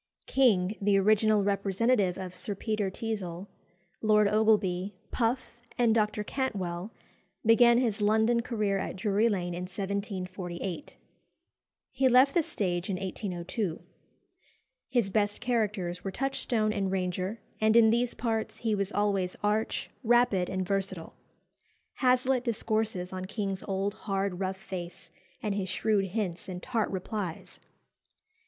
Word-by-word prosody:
King, 210 Hz, -7 st, +3 dB
the 200 Hz, 0 st, +3 dB
original 215 Hz, +1 st, +4 dB
representative 200 Hz, 0 st, +1 dB
of 185 Hz, -1 st, -6 dB
Sir 200 Hz, +3 st, -4 dB
Peter 215 Hz, -1 st, -1 dB
Teazle, 190 Hz, -4 st, -4 dB, 0.6 s
Lord 210 Hz, -1 st, +4 dB
Ogleby, 205 Hz, -3 st, +2 dB, 0.2 s
Puff, 240 Hz, 0 st, -1 dB, 0.2 s
and 235 Hz, -2 st, +4 dB
Dr. 210 Hz, -1 st, +1 dB
Cantwell, 200 Hz, -7 st, -3 dB, 0.5 s
began 235 Hz, +1 st, +6 dB
his 225 Hz, -5 st, 0 dB
London 220 Hz, +3 st, +3 dB
career 210 Hz, -5 st, -1 dB
at -, -, -4 dB
Drury 210 Hz, +3 st, +2 dB
Lane 175 Hz, -4 st, -1 dB
in 180 Hz, +1 st, -4 dB
1748. 185 Hz, 0 st, -4 dB, 0.9 s
He 260 Hz, 0 st, +3 dB
left 260 Hz, +3 st, +6 dB
the 345 Hz, -, +4 dB
stage 180 Hz, -, -2 dB
in 195 Hz, -, 0 dB
1802. 185 Hz, 0 st, -3 dB, 1.1 s
His 235 Hz, -7 st, +1 dB
best 205 Hz, 0 st, +1 dB
characters 210 Hz, -7 st, -1 dB
were 195 Hz, -, -2 dB
Touchstone 230 Hz, -2 st, -1 dB
and 195 Hz, -3 st, -1 dB
Ranger, 185 Hz, +3 st, -2 dB, 0.2 s
and 220 Hz, +1 st, +3 dB
in 225 Hz, -1 st, +7 dB
these 240 Hz, +1 st, +1 dB
parts 225 Hz, -2 st, -2 dB
he 225 Hz, -2 st, -1 dB
was 200 Hz, -1 st, -1 dB
always 200 Hz, -3 st, 0 dB
arch, 210 Hz, +1 st, 0 dB
rapid, 235 Hz, -6 st, +3 dB
and 185 Hz, -1 st, -2 dB
versatile. 195 Hz, -4 st, -2 dB, 0.8 s
Hazlitt 255 Hz, -1 st, +3 dB
discourses 220 Hz, -5 st, -1 dB
on 185 Hz, 0 st, -4 dB
King's 195 Hz, -1 st, -3 dB
old, 195 Hz, +1 st, -1 dB
hard, 195 Hz, -3 st, -2 dB
rough 190 Hz, 0 st, -2 dB
face, 180 Hz, -4 st, -8 dB, 0.3 s
and 210 Hz, -2 st, 0 dB
his 195 Hz, -2 st, -2 dB
shrewd 205 Hz, +1 st, +1 dB
hints 190 Hz, -3 st, -3 dB
and 180 Hz, -1 st, -6 dB
tart 230 Hz, -4 st, 0 dB
replies. 190 Hz, -2 st, -5 dB
205 Hz, 130 wpm, -29 LUFS, 185-225 Hz, 1.1 s, in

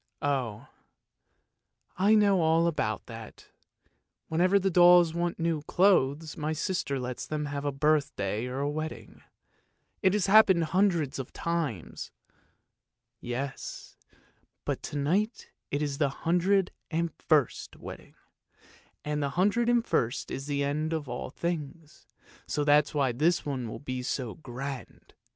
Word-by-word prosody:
" -, -, -52 dB
Oh, 130 Hz, -7 st, -1 dB, 1.3 s
I 200 Hz, +4 st, +4 dB
know 200 Hz, -4 st, +4 dB
all 165 Hz, +1 st, +3 dB
about 110 Hz, -, -1 dB
that; 115 Hz, -2 st, -11 dB, 0.8 s
whenever 180 Hz, +5 st, +3 dB
the 195 Hz, 0 st, +1 dB
dolls 175 Hz, -1 st, +6 dB
want 170 Hz, 0 st, -1 dB
new 165 Hz, -2 st, 0 dB
clothes 160 Hz, -5 st, +2 dB
my 155 Hz, -1 st, -2 dB
sister 155 Hz, -4 st, -2 dB
lets 125 Hz, 0 st, -5 dB
them 150 Hz, -1 st, -2 dB
have 145 Hz, 0 st, -4 dB
a 145 Hz, -, +1 dB
birthday 135 Hz, -7 st, 0 dB
or 130 Hz, +2 st, -3 dB
a 140 Hz, -, 0 dB
wedding. 155 Hz, +1 st, -6 dB, 0.8 s
It 190 Hz, -2 st, +3 dB
has 210 Hz, -3 st, +2 dB
happened 195 Hz, -4 st, +6 dB
hundreds 170 Hz, -5 st, +1 dB
of 130 Hz, -, -6 dB
times! 160 Hz, -, -3 dB, 0.4 s
" -, -, -47 dB
" -, -, -58 dB
Yes, 130 Hz, +3 st, -5 dB, 0.7 s
but -, -, -2 dB
to 145 Hz, -, -5 dB
night 190 Hz, -, -1 dB, 0.2 s
it's 145 Hz, -1 st, -2 dB
the 145 Hz, -2 st, +2 dB
hundred 180 Hz, +6 st, +1 dB, 0.2 s
and 170 Hz, 0 st, -1 dB
first 150 Hz, -7 st, 0 dB
wedding, -, -, -10 dB, 0.9 s
and 150 Hz, 0 st, -1 dB
the 140 Hz, -, 0 dB
hundred 205 Hz, +10 st, +2 dB
and 240 Hz, -1 st, +3 dB
first 120 Hz, +1 st, -1 dB
is 135 Hz, +1 st, -5 dB
the 140 Hz, -1 st, 0 dB
end 155 Hz, +3 st, -1 dB
of 155 Hz, -3 st, -3 dB
all 120 Hz, 0 st, -5 dB
things, 160 Hz, 0 st, -5 dB, 0.4 s
so 150 Hz, -, -1 dB
that's 145 Hz, 0 st, +3 dB
why 135 Hz, -3 st, +2 dB
this 160 Hz, +8 st, +1 dB
one 130 Hz, -5 st, -3 dB
will -, -, -6 dB
be 130 Hz, -2 st, -5 dB
so 125 Hz, -2 st, -3 dB
grand. 135 Hz, -2 st, -8 dB
150 Hz, 145 wpm, -28 LUFS, 135-175 Hz, 1.3 s, dolls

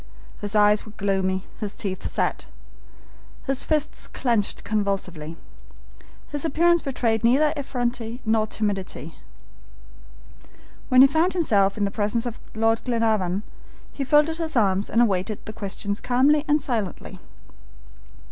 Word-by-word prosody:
His 205 Hz, +1 st, -4 dB
eyes 210 Hz, 0 st, +4 dB
were 215 Hz, -, -13 dB
gloomy, 190 Hz, -2 st, -1 dB
his 210 Hz, -2 st, -4 dB
teeth 190 Hz, -2 st, -4 dB
set, -, -, -2 dB, 1.0 s
his 270 Hz, 0 st, 0 dB
fists 305 Hz, -1 st, -1 dB
clenched 230 Hz, -6 st, -1 dB
convulsively. 190 Hz, -6 st, -2 dB, 0.9 s
His 290 Hz, -1 st, -3 dB
appearance 340 Hz, +2 st, +3 dB
betrayed 235 Hz, -5 st, -1 dB
neither 285 Hz, +6 st, +4 dB
effrontery 245 Hz, -4 st, -3 dB
nor 220 Hz, 0 st, +2 dB
timidity. 195 Hz, -7 st, -4 dB, 1.7 s
When 255 Hz, 0 st, +7 dB
he 270 Hz, -, +9 dB
found 320 Hz, +6 st, +1 dB
himself 205 Hz, -, +3 dB
in 205 Hz, -, +1 dB
the 200 Hz, -, -2 dB
presence 215 Hz, +3 st, -1 dB
of 240 Hz, -1 st, -5 dB, 0.2 s
Lord 225 Hz, +1 st, +2 dB
Glenarvan 215 Hz, -6 st, 0 dB, 0.5 s
he 280 Hz, -, -4 dB
folded 300 Hz, +4 st, +3 dB
his 320 Hz, -2 st, -3 dB
arms 200 Hz, -3 st, +2 dB
and 235 Hz, +2 st, +4 dB
awaited 200 Hz, -1 st, -1 dB
the 215 Hz, -, -7 dB
questions 200 Hz, 0 st, -3 dB
calmly 280 Hz, +5 st, +3 dB
and 300 Hz, 0 st, +3 dB
silently. 220 Hz, -, -4 dB
225 Hz, 130 wpm, -24 LUFS, 200-270 Hz, 1.7 s, he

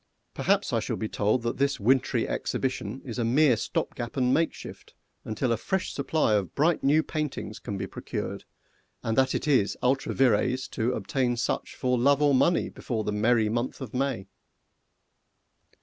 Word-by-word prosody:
Perhaps -, -, +1 dB
I -, -, +3 dB
shall -, -, -3 dB
be 110 Hz, -, -3 dB
told 110 Hz, +4 st, 0 dB
that 115 Hz, -, -2 dB
this 140 Hz, +1 st, +1 dB
wintry 130 Hz, +5 st, +2 dB
exhibition 130 Hz, 0 st, -3 dB
is 125 Hz, -1 st, -5 dB
a -, -, +1 dB
mere 130 Hz, +3 st, +4 dB
stopgap 120 Hz, +3 st, -3 dB
and 125 Hz, -1 st, +2 dB
makeshift, 165 Hz, 0 st, -3 dB, 0.3 s
until 115 Hz, +3 st, -1 dB
a 115 Hz, -, +2 dB
fresh 190 Hz, -, -2 dB
supply 140 Hz, -4 st, +1 dB
of 100 Hz, -4 st, 0 dB
bright 160 Hz, +4 st, +2 dB
new 150 Hz, +3 st, +4 dB
paintings 150 Hz, -9 st, -4 dB
can 100 Hz, -, -5 dB
be 95 Hz, -, -3 dB
procured, -, -, -5 dB, 0.6 s
and 115 Hz, -, -1 dB
that 130 Hz, +1 st, +2 dB
it -, -, -2 dB
is 130 Hz, -9 st, +2 dB
ultra 135 Hz, +2 st, +1 dB
vires 130 Hz, +1 st, +2 dB
to 120 Hz, +1 st, -1 dB
obtain 120 Hz, +3 st, -1 dB
such 120 Hz, -, -2 dB
for 125 Hz, -1 st, 0 dB
love 140 Hz, +3 st, +4 dB
or 145 Hz, -1 st, +4 dB
money 170 Hz, +6 st, +3 dB
before 115 Hz, -5 st, -4 dB
the 105 Hz, -, -2 dB
merry 110 Hz, +1 st, +2 dB
month 120 Hz, +3 st, -2 dB
of 130 Hz, -1 st, -7 dB
May. 130 Hz, -6 st, -1 dB
125 Hz, 170 wpm, -27 LUFS, 110-140 Hz, 0.6 s, mere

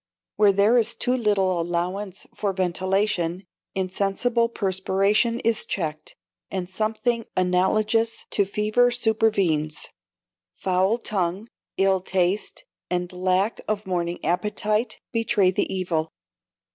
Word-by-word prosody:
Where 210 Hz, -1 st, +5 dB
there 205 Hz, +5 st, +4 dB
is 225 Hz, -, 0 dB
too 250 Hz, +1 st, 0 dB
little 195 Hz, -7 st, +1 dB
allowance 180 Hz, +3 st, -3 dB
for 200 Hz, -2 st, -2 dB
ventilation, 185 Hz, -1 st, 0 dB, 0.3 s
insensible 200 Hz, +5 st, 0 dB
perspiration 200 Hz, +3 st, +1 dB
is 225 Hz, -1 st, +1 dB
checked, 155 Hz, -4 st, -4 dB, 0.3 s
and 185 Hz, -2 st, -3 dB
something 220 Hz, +4 st, -1 dB
analogous 210 Hz, +5 st, +1 dB
to 205 Hz, -, +3 dB
fever 215 Hz, +5 st, +2 dB
supervenes; 210 Hz, -10 st, +1 dB, 0.7 s
foul 190 Hz, -, +1 dB
tongue, 200 Hz, -1 st, -1 dB, 0.3 s
ill 195 Hz, -1 st, +3 dB
taste, 190 Hz, -, -1 dB, 0.2 s
and 180 Hz, 0 st, -2 dB
lack 185 Hz, +4 st, 0 dB
of 215 Hz, -1 st, -2 dB
morning 175 Hz, -2 st, -1 dB
appetite 210 Hz, +6 st, 0 dB
betray 225 Hz, -5 st, +2 dB
the -, -, -1 dB
evil. 170 Hz, -4 st, -1 dB
195 Hz, 105 wpm, -24 LUFS, 180-215 Hz, 0.7 s, Where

